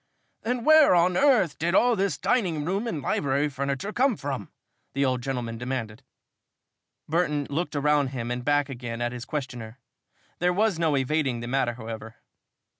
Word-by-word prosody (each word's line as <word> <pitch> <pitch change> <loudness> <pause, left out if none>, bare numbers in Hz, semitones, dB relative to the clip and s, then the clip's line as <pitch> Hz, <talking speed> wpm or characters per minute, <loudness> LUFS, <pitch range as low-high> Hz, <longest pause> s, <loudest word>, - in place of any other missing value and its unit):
"Then 245 0 -2
where 310 -9 +7
on 175 +1 +3
earth 240 - +3
did 170 +3 +1
all 245 +2 +4
this 200 -1 0
dining 170 -11 0
room 195 +7 -1
and 155 - -3
library 140 +1 0
furniture 140 +8 -3
come 255 -4 +2
from?" 135 -7 -4 0.4
the 140 0 +1
old 130 -1 0
gentleman 120 -3 -4
demanded. 120 -2 -4 1.1
Burton 150 -3 0
looked 160 +2 -2
around 145 0 +2
him 125 -2 -4
and 125 0 -3
back 145 +1 +2
again 120 -3 -6
at 120 0 -1
his 125 0 -7
questioner. 125 -6 -5 0.6
There 180 +1 +2
was 205 -2 +1
no 160 -4 +2
evading 135 -3 0
the 120 - -5
matter, 120 -2 0
however. 110 -1 -8
145 Hz, 165 wpm, -26 LUFS, 125-175 Hz, 1.1 s, where